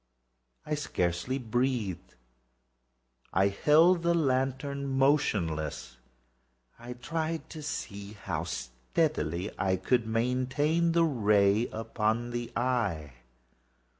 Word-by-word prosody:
I 150 - -3
scarcely 125 - -1
breathed. 120 -6 -2 1.2
I 95 +2 +4
held 160 - +4
the 170 0 +2
lantern 140 -1 0
motionless. 85 - 0 0.8
I 120 +1 -7
tried 160 +6 -3 0.8
how 85 -4 -2
steadily 85 - -2
I 95 -1 +2
could 115 +5 +1
maintain 130 +8 +1
the 170 0 +4
ray 105 -5 +3
upon 110 +1 -2
the 120 -1 -4
eve. 115 - 0
120 Hz, 85 wpm, -29 LUFS, 100-140 Hz, 1.2 s, I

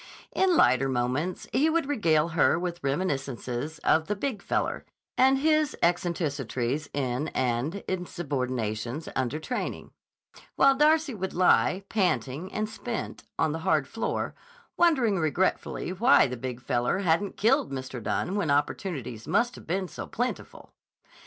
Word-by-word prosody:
In 370 -3 +3
lighter 130 +2 +4
moments 130 +8 -1
he 300 +4 +3
would 330 -3 +1
regale 170 - +2
her 160 -1 +3
with 175 -1 -4
reminiscences 135 -2 -2
of 160 0 +3
the 210 - -1
Big 215 -1 -3
Feller - - -1 0.3
and 265 +1 +5
his 310 0 +2
eccentricities 150 -6 -1
in 135 +1 -1
and 130 +10 -1
insubordinations 130 - -3
under 130 +2 -1
training, 205 +11 -4 0.6
while 275 0 +6
Darcy 305 +1 +3
would 190 -3 -4
lie, 185 +1 +3
panting 175 -5 -1
and 215 0 -2
spent, 225 +2 -5
on 160 - +2
the 160 - -3
hard 155 -4 +1
floor, 225 - -2 0.4
wondering 260 - +3
regretfully 175 +3 0
why 235 +9 +5
the 125 - -3
Big 125 0 -6
Feller 120 +3 0
hadn't 185 +2 +1
killed 260 - +2
Mr. 130 -2 -5
Dunne 180 - -1
when 200 -7 0
opportunities 140 - -1
must 240 +1 +2
have - - -13
been 185 +3 -1
so - - -7
plentiful. 245 +2 -4
170 Hz, 140 wpm, -27 LUFS, 135-215 Hz, 0.6 s, while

